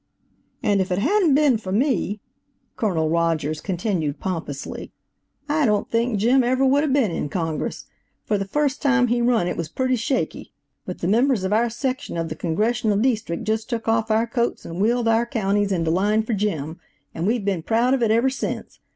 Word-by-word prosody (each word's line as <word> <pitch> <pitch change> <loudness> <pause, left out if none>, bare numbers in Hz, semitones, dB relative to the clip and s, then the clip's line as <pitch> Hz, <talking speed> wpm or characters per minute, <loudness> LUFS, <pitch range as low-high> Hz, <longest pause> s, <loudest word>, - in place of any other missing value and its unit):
"And 200 -1 +2
if 190 0 -3
it 180 - +1
hadn't 345 - +3
been 280 -6 +3
for 190 -4 -6
me," 215 -3 0 0.5
(Colonel 180 -9 0
Rogers 160 -2 0
continued 175 -6 -2
pompously, 165 -7 -5 0.6
"I 300 +1 +1
don't 210 -1 0
think 230 -1 +1
Jim 245 +6 +3
ever 260 +2 +2
would 275 +2 +4
have 300 -2 0
been 260 -8 +2
in 150 - -3
Congress; 165 -2 -3 0.4
for 210 -2 0
the 195 - -3
first 285 +5 0
time 265 -4 +3
he 240 0 +1
run 235 -7 +2
it - - -2
was 165 -2 -3
pretty 255 +6 0
shaky, 255 +3 -2 0.3
but 180 - -6
the 175 - -1
members 235 +1 +2
of 190 +2 0
our 235 +2 +2
section 255 -3 -3
of 165 -1 -2
the 155 - -5
Congressional 210 +6 0
Deestrict 220 -7 0
just 220 +1 -2
took 230 -3 -3
off 225 0 +1
our 220 +1 +2
coats 235 0 -2
and 170 +3 -5
wheeled 235 +2 +2
our 225 +1 +2
counties 205 -4 0
into 165 -3 0
line 205 +5 +2
for 225 - -3
Jim, 170 -6 -2 0.3
and 165 +3 -2
we've 225 -2 0
been 195 -4 0
proud 235 +8 +2
of 270 - +1
it 230 - +2
ever 235 +4 +3
sence. 265 - -5
220 Hz, 195 wpm, -22 LUFS, 185-245 Hz, 0.6 s, would